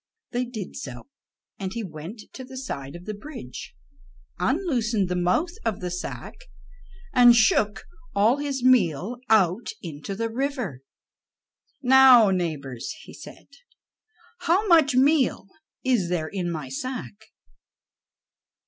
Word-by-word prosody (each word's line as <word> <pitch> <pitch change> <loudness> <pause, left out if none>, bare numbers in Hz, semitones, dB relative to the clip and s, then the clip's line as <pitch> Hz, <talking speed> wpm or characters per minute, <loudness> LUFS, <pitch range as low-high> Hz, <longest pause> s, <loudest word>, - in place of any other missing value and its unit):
They 245 0 -1
did 220 -6 -7
so, 130 - -8 0.5
and 190 -2 -4
he 230 -1 -4
went 180 +5 -8
to 260 - -8
the 260 0 -10
side 140 - -6
of 175 +1 -10
the 215 - -4
bridge, 210 - -9 0.6
unloosened 230 - 0
the 180 - -1
mouth 180 - +1
of 215 - -1
the 180 -1 -4
sack, 180 +1 -6 0.8
and 245 -1 +7
shook 220 -1 +3 0.3
all 215 +6 +4
his 280 -3 -3
meal 220 - +3
out 205 0 +3
into 165 +3 -6
the 230 +3 -1
river. 250 - -3 1.0
"Now, 255 -5 +7
neighbors," 150 - -3
he - - -13
said, - - -12 0.9
"how 370 +6 +2
much 315 -7 +5
meal 270 -4 +3 0.4
is 240 -9 +1
there 160 -3 -1
in 180 -3 -3
my 155 -5 -4
sack?" 220 - -6
220 Hz, 125 wpm, -25 LUFS, 175-255 Hz, 1.0 s, and